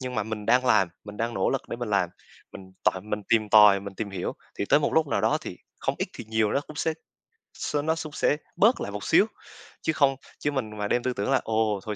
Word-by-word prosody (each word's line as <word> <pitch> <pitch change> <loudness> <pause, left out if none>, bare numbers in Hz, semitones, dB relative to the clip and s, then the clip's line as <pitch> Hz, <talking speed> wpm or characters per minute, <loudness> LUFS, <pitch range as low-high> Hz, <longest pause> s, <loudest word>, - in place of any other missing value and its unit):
nhưng 130 -1 -5
mà 110 - 0
mình 105 -1 -5
đang 130 +1 +4
làm, 95 -7 +4 0.2
mình 105 0 -9
đang 115 +1 -2
nỗ 95 - +1
lực 135 - -3
để - - -4
mình 120 -2 -4
làm, 95 -4 +2 0.4
mình 95 -1 -11
tại 95 - +2
mình 105 +1 -4
tìm 110 -2 +3
tòi, 105 -2 +7
mình 100 0 -8
tìm 105 -1 -4
hiểu, 95 -2 -3 0.3
thì - - 0
tới 145 - +5
một - - 0
lúc 160 -1 +4
nào - - 0
đó - - +2
thì, - - -8 0.2
không - - 0
ít - - -1
thì 120 - -8
nhiều 110 -1 +1
nó 140 - +2
cũng 155 - -11
sẽ 160 - 0 0.6
s - - -4
nó 160 +1 +1
sũng 155 -2 -6
sẽ 150 - +1 0.2
bớt 225 +5 +4
lại 100 - -4
một 100 -1 -6
xíu. - - +5 0.6
Chứ 160 - 0
không 140 -2 +3 0.2
chứ 145 - -1
mình 110 -6 -3
mà 105 0 -2
đem 120 - +1
tư 130 - 0
tưởng 105 +4 -2
là 135 - +3
"Ồ, 110 -2 0
thôi 105 -1 -4
110 Hz, 265 wpm, -26 LUFS, 105-135 Hz, 0.6 s, tòi